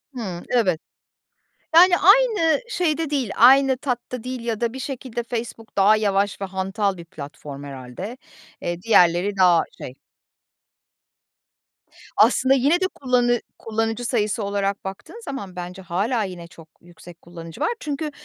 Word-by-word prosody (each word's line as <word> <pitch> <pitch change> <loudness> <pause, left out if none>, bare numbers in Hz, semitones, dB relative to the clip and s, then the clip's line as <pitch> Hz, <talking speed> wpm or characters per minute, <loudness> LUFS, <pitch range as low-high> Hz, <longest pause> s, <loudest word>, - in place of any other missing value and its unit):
Hıı, 185 -7 -5
evet. 190 -10 +2 1.0
Yani, 355 +2 +8
aynı 415 -3 +4
şeyde 325 - 0
değil, 265 -8 -1
aynı 265 +2 +6
tatta 250 -3 -4
değil 255 -1 -5
ya 230 -2 -3
da 235 0 0
bir 265 - -7
şekilde 255 -3 -5
Facebook 230 -2 -6
daha 205 +2 +6
yavaş 200 -1 0
ve - - -1
hantal 195 +1 -2
bir 170 - -10
platform 145 -2 -9
herhâlde. 140 - -8 0.4
Eee, 175 0 -4
diğerleri 190 -2 +3
daha 180 -3 +5
şey. 130 - -9 2.2
Aslında, 265 +1 +4
yine 285 +7 +3
de 370 - +2
kullanı 245 -6 +1 0.2
kullanıcı 225 +1 -2
sayısı 215 -2 0
olarak 200 -1 -2
baktığın 195 - -8
zaman 200 -10 -6
bence 180 +2 -7
hâlâ 205 +6 -1
yine 180 -3 -7
çok 165 -1 -16
yüksek 175 0 -15
kullanıcı 165 - -11
var. 310 - +2
Çünkü 300 0 -4
220 Hz, 140 wpm, -22 LUFS, 180-255 Hz, 2.2 s, Yani